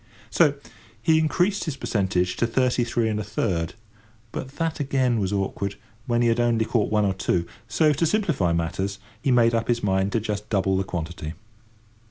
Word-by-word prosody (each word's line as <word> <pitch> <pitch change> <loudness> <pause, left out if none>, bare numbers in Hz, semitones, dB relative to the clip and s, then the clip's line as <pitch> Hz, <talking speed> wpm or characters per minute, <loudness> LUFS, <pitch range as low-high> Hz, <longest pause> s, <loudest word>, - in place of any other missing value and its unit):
So 150 -4 +4 0.4
he 160 +7 +3
increased 180 +6 +1
his 150 -5 -3
percentage 90 -3 0
to 120 - +2
thirty 125 +1 +2
three 115 -1 0
and 105 -1 -1
a - - -2
third; 90 -5 -2 0.6
but - - -4
that, 165 -1 -2
again, 130 -4 +1
was 95 -2 -1
awkward, 100 0 -2 0.3
when 120 -1 +2
he - - +3
had 115 0 +2
only 120 -2 +2
caught 115 -2 +1
one 105 -1 +3
or 95 - +1
two; 90 -2 0 0.2
so, 150 +8 +3
to 160 +4 +1
simplify 165 - +1
matters, 85 +4 -1 0.2
he 135 - 0
made 120 -2 +4
up 115 -1 0
his 120 -1 0
mind 95 0 +1
to 115 - +2
just 105 -1 -4
double 95 -2 +1
the 95 - +1
quantity. 85 -3 -5
110 Hz, 190 wpm, -24 LUFS, 95-130 Hz, 0.6 s, So